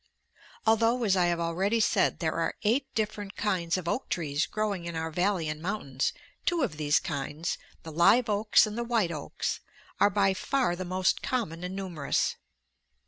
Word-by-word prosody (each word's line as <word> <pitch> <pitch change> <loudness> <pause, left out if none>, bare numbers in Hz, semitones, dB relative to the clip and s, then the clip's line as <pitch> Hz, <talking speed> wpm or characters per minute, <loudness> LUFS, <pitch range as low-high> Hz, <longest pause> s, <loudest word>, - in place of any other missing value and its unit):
Although, 230 +2 +3
as 200 -4 +3
I 180 -2 +3
have 170 -1 0
already 185 +7 +1
said, 210 -3 +2
there 160 -2 -1
are 165 -1 -1
eight 250 +6 +2
different 210 -2 -2
kinds 180 -5 0
of 180 -2 -5
oak 255 - -1
trees 150 -3 0
growing 205 -5 -2
in 170 -1 -5
our 160 0 -2
valley 180 0 +1
and 155 0 -4
mountains, 150 -8 -1 0.3
two 340 -4 +1
of 185 -12 -2
these 150 0 +3
kinds, 150 +1 -3 0.2
the 160 - -7
live 200 +10 +5
oaks 210 +1 +4
and 215 0 -5
the 235 - -1
white 230 -7 +1
oaks, 150 -3 -3 0.4
are - - +6
by 195 -2 +3
far 250 0 0
the 185 +1 -5
most 185 0 +1
common 200 - -2
and 180 +1 -4
numerous. 180 -7 -1
185 Hz, 180 wpm, -29 LUFS, 165-215 Hz, 0.4 s, are